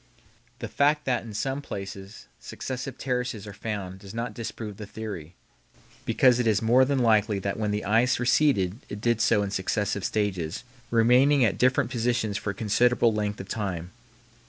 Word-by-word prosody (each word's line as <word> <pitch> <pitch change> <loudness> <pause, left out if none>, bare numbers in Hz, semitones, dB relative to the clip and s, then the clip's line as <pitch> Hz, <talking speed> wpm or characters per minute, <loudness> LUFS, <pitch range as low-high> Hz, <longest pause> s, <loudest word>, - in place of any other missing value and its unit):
The - - -5
fact 150 +1 +2
that 125 -2 +1
in 115 - -9
some 135 +6 -2
places 100 -4 -8
successive 130 0 -6
terraces 125 -5 -2
are 105 - -8
found 100 -3 -5
does 100 +2 -11
not 115 -1 -3
disprove 110 -2 -6
the 105 - -8
theory, 100 -7 -7 0.7
because 125 -2 +4
it 120 - +1
is 105 -3 +3
more 120 +4 +4
than 140 +1 +1
likely 110 -4 +3
that 100 +2 -3
when 105 -1 0
the 105 0 -2
ice 115 +4 +3
receded 120 -6 +2
it 105 - -6
did 120 0 +1
so 105 -3 +3
in 100 - -3
successive 100 +1 -1
stages, 95 -6 -2 0.3
remaining 125 +4 +4
at 95 -4 -1
different 130 0 +2
positions 120 -3 0
for 100 - -3
a - - -1
considerable 115 +2 +2
length 105 -1 -2
of 95 - -7
time. 95 -5 -4
110 Hz, 175 wpm, -26 LUFS, 100-125 Hz, 0.7 s, because